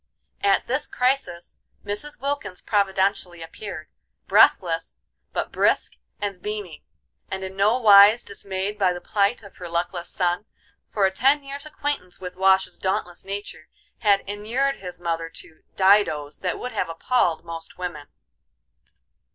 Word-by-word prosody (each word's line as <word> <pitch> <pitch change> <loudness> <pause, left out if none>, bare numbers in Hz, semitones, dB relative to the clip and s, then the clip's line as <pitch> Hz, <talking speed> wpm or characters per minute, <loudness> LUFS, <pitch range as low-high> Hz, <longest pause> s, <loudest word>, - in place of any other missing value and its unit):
At 200 -1 +3
this 260 +4 0
crisis 250 -9 -1 0.3
Mrs. 210 +9 -4
Wilkins 275 -9 -3
providentially 190 -4 0
appeared, 165 -1 -8 0.4
breathless, - - +3 0.3
but - - -3
brisk - - +1 0.2
and 200 -3 -4
beaming, 205 -7 -5 0.5
and 190 0 -4
in 190 0 -6
no 205 +5 +3
wise 210 0 +8
dismayed 200 +1 -4
by 185 -2 +3
the 175 - -6
plight 205 +5 0
of 200 - -14
her 175 -1 -7
luckless 170 +1 -2
son, 180 +2 0 0.4
for 200 -2 +2
a 190 - +2
ten 275 +8 +3
years' 280 +2 -7
acquaintance 290 -12 -4
with 180 -1 -7
Wash's 190 0 +3
dauntless 180 -2 -2
nature 195 -5 -7 0.3
had 205 -3 +4
inured 230 +7 -1
his 180 -2 -8
mother 165 -1 -2
to 160 -1 -10
"didoes" 190 -7 +3
that 180 - -2
would 250 - -5
have 175 - -2
appalled 165 -1 0
most 165 -1 -8
women. 175 -5 -5
195 Hz, 140 wpm, -24 LUFS, 175-210 Hz, 0.5 s, wise